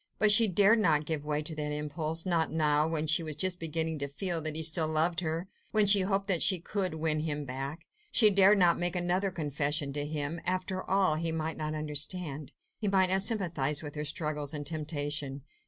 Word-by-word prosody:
But 215 Hz, -1 st, +4 dB
she 220 Hz, +2 st, +6 dB
dared 205 Hz, +4 st, +4 dB
not 155 Hz, -7 st, +2 dB
give 155 Hz, -2 st, -3 dB
way 150 Hz, 0 st, -2 dB
to 160 Hz, -, -4 dB
that 150 Hz, -1 st, -4 dB
impulse... 155 Hz, +2 st, -2 dB
not 170 Hz, -3 st, 0 dB
now, 150 Hz, -1 st, +2 dB
when 160 Hz, -1 st, -2 dB
she 155 Hz, +2 st, +2 dB
was 155 Hz, -2 st, -5 dB
just 185 Hz, +2 st, 0 dB
beginning 160 Hz, -1 st, -2 dB
to 140 Hz, -, -3 dB
feel 165 Hz, +4 st, -3 dB
that 155 Hz, 0 st, -3 dB
he 160 Hz, -, +2 dB
still 160 Hz, 0 st, +2 dB
loved 160 Hz, +2 st, 0 dB
her, 165 Hz, +1 st, -3 dB, 0.2 s
when 215 Hz, -1 st, +4 dB
she 200 Hz, 0 st, +6 dB
hoped 195 Hz, +1 st, -1 dB
that 185 Hz, -5 st, 0 dB
she 185 Hz, -3 st, +4 dB
could 185 Hz, -1 st, -3 dB
win 155 Hz, -1 st, -1 dB
him 150 Hz, -2 st, -3 dB
back. 135 Hz, +5 st, -6 dB, 0.3 s
She 215 Hz, -4 st, +7 dB
dared 200 Hz, +1 st, +5 dB
not 175 Hz, -3 st, +3 dB
make 175 Hz, 0 st, -1 dB
another 180 Hz, +2 st, 0 dB
confession 145 Hz, -3 st, -2 dB
to 145 Hz, 0 st, -2 dB
him. 150 Hz, +2 st, -4 dB
After 185 Hz, +1 st, -2 dB
all, 190 Hz, -5 st, +2 dB
he 165 Hz, +1 st, -2 dB
might 160 Hz, 0 st, -3 dB
not 155 Hz, 0 st, -4 dB
understand; 150 Hz, -1 st, -2 dB, 0.3 s
he 210 Hz, -, -2 dB
might 190 Hz, -2 st, +2 dB
not 190 Hz, +1 st, +3 dB
sympathise 170 Hz, -, -1 dB
with 145 Hz, -1 st, -7 dB
her 150 Hz, -, -4 dB
struggles 150 Hz, -1 st, -2 dB
and 145 Hz, -1 st, -5 dB
temptation. 145 Hz, -3 st, -4 dB
160 Hz, 210 wpm, -29 LUFS, 150-185 Hz, 0.3 s, She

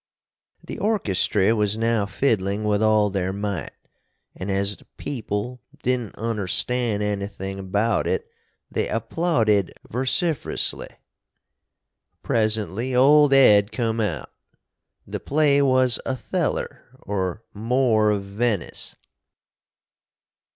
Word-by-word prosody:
The -, -, -7 dB
orchestry 110 Hz, -, +2 dB
was 105 Hz, -1 st, 0 dB
now 115 Hz, -2 st, +1 dB
fiddling 100 Hz, -4 st, 0 dB
with 105 Hz, 0 st, +1 dB
all 110 Hz, -2 st, +3 dB
their 95 Hz, -1 st, -1 dB
might 100 Hz, -3 st, -3 dB, 0.5 s
& -, -, -51 dB
as 100 Hz, +1 st, -1 dB
the -, -, -20 dB
peeple 120 Hz, -1 st, -4 dB, 0.2 s
didn't 125 Hz, -4 st, -1 dB
understan 115 Hz, +1 st, -1 dB
anything 100 Hz, -1 st, -4 dB
about 105 Hz, +4 st, 0 dB
it -, -, -1 dB, 0.4 s
they -, -, -1 dB
applaudid 115 Hz, -, +1 dB, 0.2 s
versifrusly. 135 Hz, -, 0 dB, 1.3 s
Presently 110 Hz, +2 st, 0 dB
old 145 Hz, +3 st, +6 dB
Ed 105 Hz, -6 st, +6 dB
cum 115 Hz, -2 st, -1 dB
out. 85 Hz, -10 st, -3 dB, 0.7 s
The -, -, -5 dB
play 145 Hz, -1 st, +2 dB
was 130 Hz, -2 st, +3 dB
Otheller 135 Hz, +5 st, -2 dB, 0.2 s
or 95 Hz, +1 st, -3 dB
More 110 Hz, 0 st, +2 dB
of 100 Hz, -2 st, 0 dB
Veniss. 100 Hz, 0 st, -2 dB
110 Hz, 100 wpm, -23 LUFS, 100-125 Hz, 1.3 s, old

